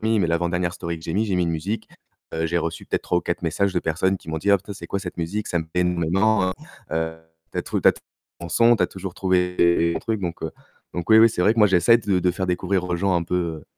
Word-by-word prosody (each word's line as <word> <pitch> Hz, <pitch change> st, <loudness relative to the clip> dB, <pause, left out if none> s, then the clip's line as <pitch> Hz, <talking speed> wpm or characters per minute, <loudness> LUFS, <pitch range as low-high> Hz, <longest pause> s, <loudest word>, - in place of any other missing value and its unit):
j'ai 110 Hz, -, 0 dB
mis, 110 Hz, -, +3 dB
mais 85 Hz, -, +2 dB
l'avant-dernière 85 Hz, +1 st, 0 dB
story 85 Hz, -3 st, -5 dB
que 80 Hz, -, -14 dB
j'ai 80 Hz, -, -3 dB
mis, 110 Hz, +2 st, +2 dB
j'ai 100 Hz, -4 st, -1 dB
mis 90 Hz, -, +2 dB
une 85 Hz, -, -1 dB
musique, 95 Hz, +8 st, -3 dB, 0.5 s
heu, 80 Hz, -, -1 dB
j'ai 85 Hz, +1 st, 0 dB
reçu 85 Hz, -1 st, -4 dB
peut-être -, -, -1 dB
3 90 Hz, -, +1 dB
ou -, -, -3 dB
4 85 Hz, -, -2 dB
messages 95 Hz, +4 st, 0 dB
de 90 Hz, -, +1 dB
personnes 95 Hz, +4 st, 0 dB
qui -, -, -16 dB
m'ont 80 Hz, -, -2 dB
dit: 100 Hz, -, 0 dB
«Oh, -, -, +7 dB
putain, 100 Hz, +2 st, -9 dB
c'est -, -, -9 dB
quoi 100 Hz, -, -2 dB
cette 90 Hz, -3 st, -7 dB
musique? 100 Hz, +6 st, -3 dB
Ça 85 Hz, -, 0 dB
me 80 Hz, -, -3 dB
plait 90 Hz, +3 st, -2 dB
énormément, 90 Hz, +4 st, +2 dB
hein. -, -, -1 dB, 0.4 s
Heu, 80 Hz, 0 st, -1 dB, 0.4 s
tu -, -, -3 dB
as -, -, 0 dB
trouvé -, -, -2 dB
tu -, -, +7 dB
as -, -, +5 dB
trouvé -, -, -19 dB, 0.3 s
un -, -, -7 dB
bon 85 Hz, -, -6 dB
son, 115 Hz, +6 st, +5 dB
tu -, -, +1 dB
as -, -, +3 dB
toujours 95 Hz, -1 st, -7 dB
trouvé 90 Hz, -2 st, +1 dB
des 85 Hz, 0 st, +4 dB
des 85 Hz, 0 st, +2 dB
bons -, -, -1 dB
trucs», 110 Hz, -3 st, -2 dB
donc 85 Hz, -2 st, -4 dB
heu, 80 Hz, -, -3 dB, 0.4 s
donc 85 Hz, -1 st, -4 dB
oui, 110 Hz, -, +8 dB
oui, 115 Hz, +1 st, +8 dB
c'est 90 Hz, -, -3 dB
vrai 105 Hz, -, +5 dB
que -, -, -5 dB
moi 105 Hz, -, +7 dB
j'essaie 95 Hz, +5 st, +5 dB
de 100 Hz, -5 st, 0 dB
de 90 Hz, -, +2 dB
faire 95 Hz, +1 st, -3 dB
découvrir 90 Hz, +1 st, 0 dB
aux 90 Hz, -1 st, -1 dB
gens 95 Hz, +1 st, +1 dB
un 85 Hz, -, 0 dB
peu, 85 Hz, +2 st, -4 dB, 0.3 s
heu, -, -, -19 dB
90 Hz, 320 wpm, -23 LUFS, 85-100 Hz, 0.5 s, oui